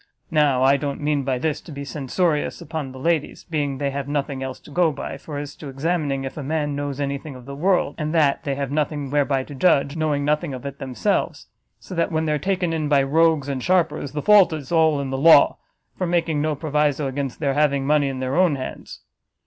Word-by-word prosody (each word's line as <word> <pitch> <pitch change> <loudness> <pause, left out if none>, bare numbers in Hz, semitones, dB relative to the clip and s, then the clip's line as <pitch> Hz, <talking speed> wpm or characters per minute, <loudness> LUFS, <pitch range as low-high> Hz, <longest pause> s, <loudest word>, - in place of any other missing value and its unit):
Now 145 -5 +3
I 135 +1 +5
don't 140 0 -3
mean 150 -1 0
by 130 -1 -1
this 155 +3 -2
to 165 - -12
be 140 -1 -6
censorious 150 +3 -1
upon 150 -3 -5
the 130 - -10
ladies, 160 +2 -1
being 145 -4 -2
they 140 0 -1
have 140 0 -4
nothing 140 -2 -2
else 130 -1 -5
to - - -15
go 170 +1 +3
by, - - -6
for 150 -2 -8
as 145 0 -6
to 150 - -8
examining 140 -1 -1
if 135 - -6
a - - -3
man 145 0 -1
knows 145 -1 -4
any 140 -1 -2
thing 145 -2 -9
of 125 -1 -12
the 140 - -7
world, 175 0 +1
and 155 -1 -2
that, 150 -4 +2
they 140 -1 -2
have 140 -1 -3
nothing 145 -2 -2
whereby 140 -2 +1
to 145 - -10
judge, 140 0 +2
knowing 150 -3 0
nothing 150 -1 0
of 125 - -9
it 140 0 -6
themselves. 125 -8 -1 0.3
So - - -10
that 170 -1 0
when 160 0 0
they 155 - 0
are 150 - 0
taken 185 0 -1
in 155 -2 -1
by 140 -2 +4
rogues 155 0 +2
and 135 -2 -3
sharpers, 160 -4 +1
the 150 - -3
fault 210 -4 +6
is 150 -2 -6
all 160 -3 +3
in 135 -1 -3
the 135 - -2
law, 160 -1 +6 0.4
for 185 - -2
making 165 -3 +1
no 155 0 0
proviso 150 -1 0
against 135 -1 -3
their 140 -3 0
having 140 -2 +2
money 145 0 +3
in 135 -1 -4
their 130 +1 -2
own 175 -4 +4
hands. 130 -1 -7
145 Hz, 235 wpm, -22 LUFS, 140-155 Hz, 0.4 s, fault